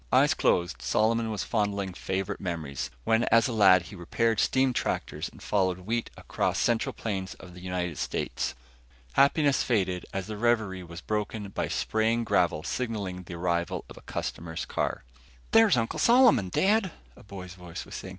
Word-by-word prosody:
Eyes - - +5
closed, 85 -1 +1
Solomon 115 +1 +1
was 105 -2 -2
fondling 100 -4 -1
favorite 95 +1 -3
memories, 75 -7 -4
when 115 - +2
as 115 +2 +4
a 125 - -3
lad 95 -5 +6
he 100 - -11
repaired 110 +5 0
steam 130 -1 +2
tractors - - -2
and - - -15
followed 95 -3 +1
wheat 115 +5 -2
across - - -1
central 115 -2 +1
plains 95 -4 -4
of 90 -2 -13
the 90 - -12
United 90 -4 -3
States. - - -2 0.6
Happiness 140 0 +4
faded 95 -6 0
as 95 -1 -3
the 105 +1 -6
reverie 110 -5 +1
was 85 0 -9
broken 105 -1 -3
by - - -2
spraying 110 +2 0
gravel 85 -7 +1
signaling 100 -5 -3
arrival 85 -1 -2
of - - -12
a - - -13
customer's 80 -1 -5
car. - - -2 0.5
"There's 225 - +6
Uncle 115 -1 -1
Solomon, 235 - +5
Dad," 200 - +2 0.3
a - - -15
boy's 95 -3 -9
voice 90 -2 -8
was - - -12
saying. 95 - -6
100 Hz, 165 wpm, -28 LUFS, 90-115 Hz, 0.6 s, lad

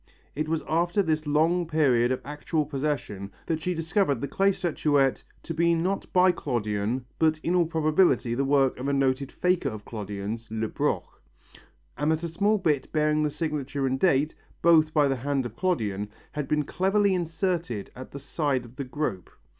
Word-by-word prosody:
It 155 +2 -3
was 160 -1 -1
after 175 +5 +2
this 155 -2 -1
long 165 +4 +2
period 130 -7 +3
of 130 - -1
actual 150 +1 -2
possession 135 -9 -3
that 160 -1 -2
she 180 +2 -1
discovered 165 - +1
the 140 - -3
clay 195 +5 +2
statuette 145 -7 +1 0.2
to 165 - -4
be 170 +1 +3
not 185 +4 -2
by 185 0 +5
Clodion 120 -5 -2
but 155 -1 +3
in 170 - 0
all 175 -2 +3
probability 155 -6 +2
the 135 +3 0
work 135 -2 +2
of 130 - -3
a 140 - +1
noted 135 0 +1
faker 180 -5 +1
of 110 -3 -8
Clodions, 105 +1 -5
Lebroc, 110 0 -1 1.0
and 150 +2 +2
that 160 +1 -1
a - - -1
small 205 +6 +2
bit 155 -8 0
bearing 155 -1 +2
the 150 - +1
signature 145 -3 -2
and 130 0 0
date, 150 -3 +3 0.3
both 160 -2 +5
by 150 -2 +3
the 135 -1 0
hand 135 +1 -1
of 115 -2 -6
Clodion, 105 - -1 0.2
had 150 -2 -4
been 150 0 +1
cleverly 195 +5 +2
inserted 170 - -2
at 130 +1 -9
the - - -8
side 140 -2 -1
of 120 +2 -15
the 140 - -2
group. 125 - -3
150 Hz, 180 wpm, -26 LUFS, 130-165 Hz, 1.0 s, by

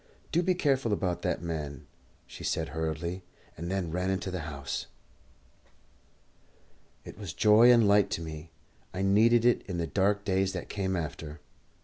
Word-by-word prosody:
"Do 170 - +3
be 185 +1 +1
careful 135 - +1
about 90 -3 -1
that - - -2
man," 75 -3 -5 0.4
she - - -11
said 80 0 -1
hurriedly, 80 +3 -3 0.3
and 85 +2 -5
then 95 -4 -2
ran 90 +2 -1
into 95 0 -2
the 90 - -3
house. 70 -2 -5 2.2
It - - -10
was 95 -7 -6
joy 110 +6 +6
and 115 -3 +5
light 100 0 +4
to - - -6
me, 80 0 -7 0.4
and 95 +1 -1
I - - +2
needed 115 +3 +5
it 120 - +4
in 90 -3 -4
the 85 - -1
dark 100 +3 +1
days 95 -1 +1
that 90 - -6
came 95 -2 -2
after. 75 -2 -5
95 Hz, 165 wpm, -29 LUFS, 80-105 Hz, 2.2 s, joy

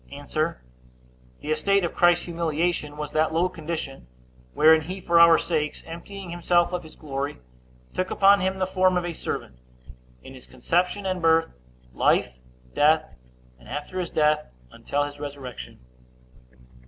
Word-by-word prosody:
A. 145 +1 -9 1.2
The 155 - -4
estate 195 +6 +2
of - - -4
Christ's 175 0 +3
humiliation 165 -2 -2
was 150 -1 -5
that 155 +1 +1
low 175 +2 +2
condition, 155 - -6 0.5
wherein 160 +1 +6
he 185 +5 -6
for 170 -2 +3
our 170 -1 +8
sakes, 150 -3 -2
emptying 175 +3 -9
himself 175 0 +1
of 180 - -2
his 160 -2 -14
glory, 140 -1 -4 0.6
took 185 0 -2
upon 200 +1 +5
him 190 0 -1
the 185 - 0
form 185 -1 +2
of 175 - -1
a 175 - -3
servant, 65 - -6 0.6
in 130 - -11
his 130 - -13
conception 180 +4 -1
and 185 -1 -2
birth, 165 - +3 0.4
life, 60 - +2 0.4
death, 155 +2 +3 0.5
and 60 - -16
after 150 +6 -5
his 180 - -3
death, 150 0 +1 0.2
until 145 0 -2
his 145 0 -7
resurrection. 135 - -8
165 Hz, 150 wpm, -25 LUFS, 150-180 Hz, 1.2 s, our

